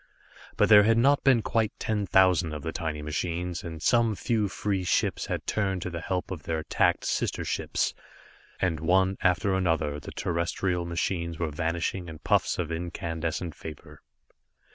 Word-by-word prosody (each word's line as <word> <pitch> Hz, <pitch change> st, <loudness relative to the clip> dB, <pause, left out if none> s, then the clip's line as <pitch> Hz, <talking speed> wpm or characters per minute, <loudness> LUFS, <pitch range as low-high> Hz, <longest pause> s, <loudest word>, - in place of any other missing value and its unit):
But -, -, +4 dB
there 105 Hz, -1 st, +9 dB
had 115 Hz, +2 st, +3 dB
not 140 Hz, +4 st, +4 dB
been 125 Hz, -5 st, +4 dB
quite 110 Hz, -2 st, 0 dB
ten 105 Hz, -2 st, -1 dB
thousand 90 Hz, -3 st, +4 dB
of 75 Hz, -, -6 dB
the 80 Hz, -, -3 dB
tiny 75 Hz, -3 st, -4 dB
machines, 85 Hz, +4 st, -3 dB
and 80 Hz, -2 st, -7 dB
some 115 Hz, -3 st, +3 dB
few 110 Hz, -1 st, 0 dB
free 100 Hz, -1 st, -2 dB
ships 90 Hz, -, 0 dB
had -, -, -3 dB
turned 95 Hz, -4 st, -1 dB
to 90 Hz, -, -4 dB
the 85 Hz, -1 st, -5 dB
help 90 Hz, +2 st, -3 dB
of 90 Hz, -5 st, -5 dB
their 80 Hz, -1 st, -2 dB
attacked 80 Hz, -, +1 dB
sister -, -, -1 dB
ships. -, -, -1 dB, 0.7 s
And 85 Hz, -4 st, 0 dB
one 95 Hz, +4 st, +2 dB
after 95 Hz, +2 st, +2 dB
another 80 Hz, -6 st, 0 dB
the -, -, -9 dB
terrestrial 85 Hz, +1 st, -1 dB
machines 85 Hz, -1 st, -2 dB
were 80 Hz, -2 st, -2 dB
vanishing 85 Hz, +3 st, -2 dB
in 80 Hz, -1 st, -8 dB
puffs -, -, +1 dB
of 85 Hz, -2 st, -2 dB
incandescent 85 Hz, 0 st, -3 dB
vapor. 75 Hz, +1 st, -10 dB
90 Hz, 165 wpm, -27 LUFS, 80-95 Hz, 0.7 s, there